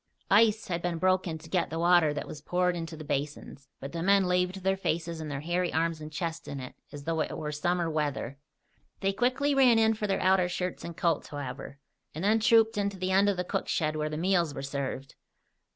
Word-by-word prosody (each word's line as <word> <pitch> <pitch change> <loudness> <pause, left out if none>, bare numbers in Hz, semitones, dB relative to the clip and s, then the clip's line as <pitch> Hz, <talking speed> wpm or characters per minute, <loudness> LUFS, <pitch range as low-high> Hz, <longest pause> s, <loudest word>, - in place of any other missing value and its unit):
Ice 215 +1 +4
had 170 -3 -2
been 175 -1 -2
broken 185 -2 +1
to 160 +1 -13
get 180 +2 0
the 165 - -4
water 170 -2 +4
that 145 - -4
was 150 - -8
poured 180 +3 +1
into 165 -1 -5
the 155 - -8
basins, 140 -1 -4
but 135 - -7
the 170 - -4
men 195 +2 +4
laved 180 +1 0
their 190 0 +2
faces 170 -3 -2
and 155 - -5
their 140 -1 -4
hairy 175 +3 -1
arms 165 0 0
and 155 0 -7
chests 165 +1 -4
in 140 - -5
it 130 -1 -8 0.2
as 145 -1 -8
though 165 +1 -1
it - - -3
were 150 -1 -4
summer 175 +3 0
weather. 145 -4 -2 0.6
They 195 0 +1
quickly 255 +6 +1
ran 260 -4 +5
in 220 0 +4
for 215 -1 -3
their 195 - 0
outer 185 -1 +3
shirts 180 0 -3
and 170 -1 -7
coats, 165 -3 0
however, 140 -1 -7 0.4
and 160 - -4
then 215 +3 +3
trooped 225 -1 +4
in 200 0 +1
to 200 - -10
the 185 0 -2
end 195 +2 +4
of 200 - 0
the 180 - 0
cook - - -3
shed 155 -2 0
where 155 0 -1
the 155 - -4
meals 170 -3 +1
were - - -5
served. 135 -1 -4
170 Hz, 230 wpm, -29 LUFS, 155-190 Hz, 0.6 s, ran